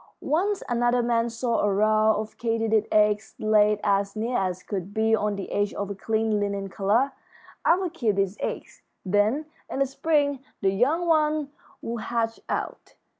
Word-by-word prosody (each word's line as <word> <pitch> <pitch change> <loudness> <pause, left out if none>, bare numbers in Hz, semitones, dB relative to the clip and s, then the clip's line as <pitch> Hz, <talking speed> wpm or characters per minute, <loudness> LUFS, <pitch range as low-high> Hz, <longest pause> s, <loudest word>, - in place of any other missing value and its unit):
Once 390 +5 +1
another 240 0 +2
man 235 0 +1
saw 230 0 -1
a 205 - +2
row 215 +2 +3
of 215 0 -5
katydid 225 -2 +1
eggs 210 0 +2
laid 210 -1 +3
as 200 0 +1
neatly 230 +3 -2
as 185 -3 -1
could 200 0 -5
be 220 0 +3
on 210 -1 -1
the 195 - -6
edge 205 0 0
of 200 0 -3
a - - -2
clean 220 +1 0
linen 200 -1 -2
collar. 215 +9 +1 0.5
I'll 365 +2 +3
keep 240 - -1
these 195 0 0
eggs; - - -5 0.2
then, 210 +10 +2 0.2
in - - -4
the 275 - +3
spring, 285 0 0 0.2
the 195 - +2
young 280 - +1
ones 305 -3 +2 0.3
will 235 +1 -3
hatch 225 0 -2
out. - - -4
220 Hz, 170 wpm, -25 LUFS, 205-250 Hz, 0.5 s, row